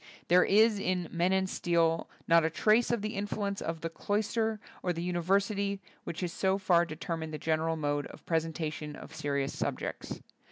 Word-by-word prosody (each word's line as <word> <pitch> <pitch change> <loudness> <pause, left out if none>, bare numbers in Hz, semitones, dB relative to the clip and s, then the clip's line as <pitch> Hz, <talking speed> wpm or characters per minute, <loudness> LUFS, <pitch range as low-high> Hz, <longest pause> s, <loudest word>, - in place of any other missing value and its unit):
There 180 +1 +7
is 215 +1 +5
in 180 -3 0
"Men 175 +2 +1
and 190 0 +2
Steel" 165 -2 +1 0.2
not 165 0 +6
a 160 - +2
trace 215 +8 +3
of 235 -4 0
the 215 - -2
influence 200 0 -2
of 165 0 -3
the 165 - -2
cloister 220 +4 0 0.2
or 180 - 0
the 170 0 -4
university 195 +3 +1 0.3
which 170 - -5
has 175 -2 -2
so 190 0 +1
far 175 -3 +4
de 155 - -6
termined 165 0 -4
the 155 - -4
general 160 +1 0
mode 145 -2 -1
of - - -14
presen 165 -1 0
tation 155 -2 -4
of 160 - -11
serious 140 -3 -1
subjects. - - -3
175 Hz, 190 wpm, -31 LUFS, 160-200 Hz, 0.3 s, There